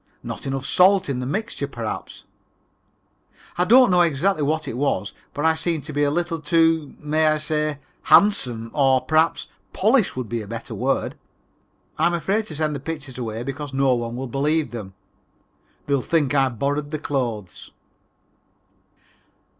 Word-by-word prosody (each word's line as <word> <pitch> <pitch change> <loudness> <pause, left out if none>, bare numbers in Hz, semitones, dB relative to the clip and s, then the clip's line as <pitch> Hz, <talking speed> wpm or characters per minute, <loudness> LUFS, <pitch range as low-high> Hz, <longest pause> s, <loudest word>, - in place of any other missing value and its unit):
Not - - -6
enough 135 0 -3
salt 185 0 +4
in 130 -2 -1
the 125 - -4
mixture, 195 - -3
perhaps. 120 -5 -6 1.3
I 180 - +1
don't 245 +1 +6
know 180 -1 +5
exactly 170 +2 +1
what 155 +1 0
it 115 - -4
is 140 +3 -1 0.2
but 145 +2 -3
I 160 - +5
seem 160 0 -1
to 150 - -8
be 145 - 0
a 145 - +3
little 170 +2 -1
too, 160 -1 +2
may 155 +1 +1
I 155 0 +3
say, 155 -1 -1 0.3
handsome 125 - +4
or, 135 -3 +3
perhaps, 160 +1 +1 0.3
polished 235 - +2
would 125 -3 -3
be 115 +1 -3
the 105 - -9
better 115 +2 -6
word. - - -1 0.8
I'm 175 - +3
afraid 200 +7 -1
to 155 - -7
send 155 0 -1
the - - -4
pictures 145 -3 -6
away 115 -1 -4
because 140 +1 -6
no 135 -1 +3
one 120 -1 -3
will 130 +2 -4
believe 145 +5 0
them. 100 -5 -8 0.9
They 140 - -1
will 140 - +2
think 145 -1 +1
I 135 -2 +3
borrowed 140 +4 -2
the 155 - -3
clothes. 120 - -4
145 Hz, 165 wpm, -22 LUFS, 130-160 Hz, 1.3 s, don't